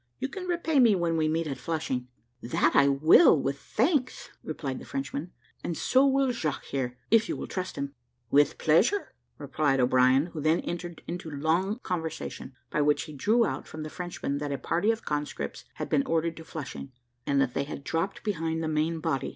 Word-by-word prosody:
You 265 - -3
can 375 +2 -6
repay 340 -4 +1
me 230 -5 +6
when 170 -2 0
we 155 -1 +2
meet 165 +1 0
at 135 -4 -4
Flushing." 145 -6 -2 0.3
"That 120 - +1
I 140 - +6
will, 155 - +6
with 140 +1 -2
thanks," 255 - 0
replied 140 -4 -4
the - - -10
Frenchman, 140 +5 -4 0.3
"and 170 - -3
so 265 +2 +4
will 270 -1 +3
Jaques, 160 - -3
here, 125 -2 -2
if 225 0 +4
you - - -2
will - - -5
trust 185 -1 -4
him." 140 0 -4 0.4
"With 145 0 +4
pleasure," 210 - +2 0.2
replied 145 -1 0
O'Brien, 130 +5 +4
who 155 - -4
then 155 +3 +2
entered 175 -1 -6
into 175 -1 -5
along 170 - 0
conversation, 160 -6 -4 0.2
by 150 - +1
which 145 0 +2
he 155 - -9
drew 220 - +3
out - - -4
from 155 0 -7
the 155 - -7
Frenchmen 175 -5 -4
that 145 -1 -3
a 140 - -1
party 175 +9 0
of 225 0 0
conscripts 150 -1 -3
had - - -4
been 275 - +1
ordered 165 0 0
to 160 - -8
Flushing, 145 -3 -7 0.4
and 140 -1 +2
that 135 -2 +1
they 140 - -1
had 140 -1 -7
dropped 165 +7 -2
behind 165 -5 -1
the - - -1
main 155 +1 0
body. 135 -3 -1
160 Hz, 200 wpm, -28 LUFS, 140-185 Hz, 0.4 s, me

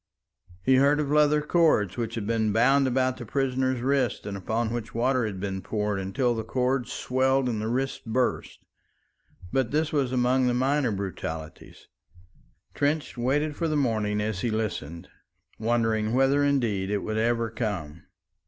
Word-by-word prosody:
He 130 +4 +4
heard 140 +2 +4
of 145 -2 -1
leather 150 0 +4
cords 150 - +2
which 115 -2 -3
had 110 -3 -3
been 110 -1 +1
bound 135 +5 +4
about 130 0 +1
the 120 - -7
prisoner's 130 -1 0
wrists, 130 -2 0
and 100 - -4
upon 110 +4 -2
which 115 -2 -5
water 125 0 +1
had 100 -3 -6
been 95 -1 -3
poured 105 -1 -2
until 120 +6 0
the 110 -1 -3
cords 125 +2 -1
swelled 130 +1 +1
and 110 -3 -2
the 110 - -2
wrists 130 +3 -2
burst, 125 +3 -2 0.9
but 130 -4 +1
this 155 +3 0
was 135 -4 +1
among 125 0 +2
the 120 - +1
minor 135 0 +1
brutalities. 80 -5 -6 0.9
Trench 145 +1 -1
waited 145 +5 0
for 165 - -1
the 155 - -1
morning 110 -6 0
as 105 -3 -2
he 120 - 0
listened, 90 -6 -3 0.5
wondering 115 -1 +1
whether 135 +2 +3
indeed 115 -9 +1
it 105 -1 -1
would 110 0 -2
ever 115 0 0
come. 95 -9 -4
120 Hz, 160 wpm, -26 LUFS, 110-135 Hz, 0.9 s, He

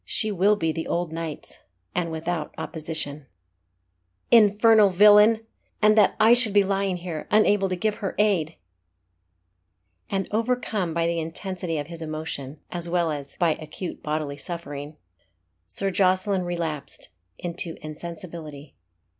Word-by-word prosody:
She 215 -2 -2
will 200 +2 +3
be 165 -5 0
the 160 +1 -4
old 170 -2 -2
knight's, 165 -2 -6 0.3
and 170 -2 -1
without 160 0 -3
opposition." 155 -3 -4 1.0
"Infernal 215 -1 +6
villain! 210 +4 +6 0.3
and 215 0 +5
that 210 -3 +4
I 225 +2 +7
should 240 -4 +3
be 205 -1 +5
lying 195 -1 0
here, 170 -3 -6
unable 205 -2 +3
to 185 - -1
give 215 +4 0
her 195 - -3
aid!" 185 -7 +1 1.5
And 195 -1 -1
overcome 220 -6 -1
by 165 0 +1
the 170 0 0
intensity 170 +1 -3
of 145 - -3
his 165 +1 -9
emotion, 155 -3 -5
as 175 -1 -3
well 170 -2 +1
as 140 -2 -6
by 170 -2 +3
acute 155 +4 -7
bodily 150 -2 -3
suffering, 150 -2 -6 0.7
Sir 195 -1 -1
Jocelyn 185 0 +2
relapsed 165 -5 -4 0.3
into 170 -1 -3
insensibility. 160 -2 -8
175 Hz, 135 wpm, -25 LUFS, 160-200 Hz, 1.5 s, I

